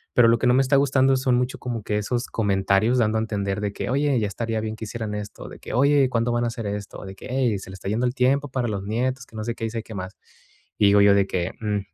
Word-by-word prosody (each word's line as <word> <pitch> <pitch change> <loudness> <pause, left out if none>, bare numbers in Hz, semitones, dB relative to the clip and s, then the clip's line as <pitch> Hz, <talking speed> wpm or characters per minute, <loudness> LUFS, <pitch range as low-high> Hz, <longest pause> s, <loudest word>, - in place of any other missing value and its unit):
Pero 120 -2 +6
lo 115 - +4
que - - 0
no 125 - +5
me 135 - +5
está 135 +2 +2
gustando 135 -1 +3
son 130 -1 +1
mucho 125 +1 -1
como 120 -3 -4
que 105 0 -1
esos 120 +4 -2
comentarios 100 +3 +1
dando 110 -1 +2
a - - 0
entender 100 -2 -2
de 100 -1 -2
que, - - -4
oye, 140 -1 +2
ya 105 - 0
estaría 115 +2 -3
bien 110 0 -4
que 110 0 -7
hicieran 110 -1 -4
esto, 105 -1 -7
de - - -12
que, - - -8
oye, 140 +2 +4
¿cuándo 120 -1 0
van 120 0 0
a - - +1
hacer 115 -2 -4
esto?, 100 0 -5
o - - -9
de 95 0 -8
que, - - -11
ey, 125 -4 +1
se 95 - -11
le - - -9
está 95 - -6
yendo 115 +4 0
el 125 - -1
tiempo 135 +2 +2
para 125 -2 -1
los 100 -2 -3
nietos, 125 +4 -2
que 110 - -17
no 110 - -4
sé 115 +1 -3
qué, 115 - -4
y - - -2
sé 115 0 -3
qué 110 - -10
más. 95 +1 -6 0.6
Y 105 - +4
digo 100 0 +5
yo 100 0 +6
de 100 - +3
que, 90 -1 -2
mm, 105 -2 0
115 Hz, 300 wpm, -24 LUFS, 105-125 Hz, 0.6 s, Pero